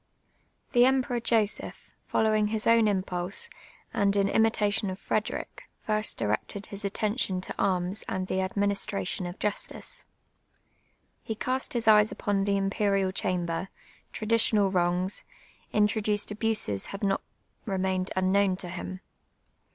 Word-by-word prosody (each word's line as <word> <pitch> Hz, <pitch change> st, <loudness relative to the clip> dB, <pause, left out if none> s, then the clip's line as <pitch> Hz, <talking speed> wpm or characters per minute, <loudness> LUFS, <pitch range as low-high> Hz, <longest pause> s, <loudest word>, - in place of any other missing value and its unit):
r'llie 245 Hz, 0 st, +6 dB
Emperor 260 Hz, -2 st, +1 dB
Joseph, 225 Hz, -3 st, 0 dB, 0.2 s
followiu!:: 215 Hz, -1 st, +3 dB
his 215 Hz, 0 st, -1 dB
own 230 Hz, -1 st, +5 dB
im])ulsc, 190 Hz, -, -1 dB, 0.4 s
and 200 Hz, 0 st, +2 dB
m 200 Hz, -, +3 dB
imi 225 Hz, 0 st, +4 dB
tation 205 Hz, -2 st, 0 dB
of 185 Hz, -, -6 dB
Frederic, 215 Hz, +1 st, -3 dB
first 215 Hz, 0 st, 0 dB
directed 110 Hz, -, -2 dB
his 200 Hz, +1 st, -6 dB
attention 205 Hz, 0 st, 0 dB
to 185 Hz, -, -5 dB
arms 185 Hz, +1 st, 0 dB
auid 185 Hz, 0 st, -2 dB
the 190 Hz, -, 0 dB
administration 195 Hz, -1 st, -1 dB
of 175 Hz, -, -7 dB
justice. 210 Hz, -1 st, -3 dB, 1.2 s
He 220 Hz, -, -4 dB, 0.2 s
east 260 Hz, -, -1 dB
his 235 Hz, -2 st, -1 dB
eyes 210 Hz, -1 st, +6 dB
ujxrn 200 Hz, -1 st, -1 dB
the 200 Hz, 0 st, +2 dB
Imperial 195 Hz, -1 st, +1 dB
Chamber; 180 Hz, -1 st, -1 dB, 0.4 s
traditional 215 Hz, -3 st, +2 dB
wrouijs, 180 Hz, +1 st, +1 dB, 0.5 s
introduced 210 Hz, 0 st, +1 dB
abuses 210 Hz, -, +2 dB
had 200 Hz, +1 st, -7 dB
not 195 Hz, -1 st, +1 dB, 0.5 s
re 195 Hz, -2 st, -1 dB
mained 185 Hz, 0 st, 0 dB
unknown 190 Hz, +1 st, +2 dB
to 180 Hz, -, -6 dB
him. 185 Hz, +1 st, -6 dB
200 Hz, 130 wpm, -28 LUFS, 185-215 Hz, 1.2 s, r'llie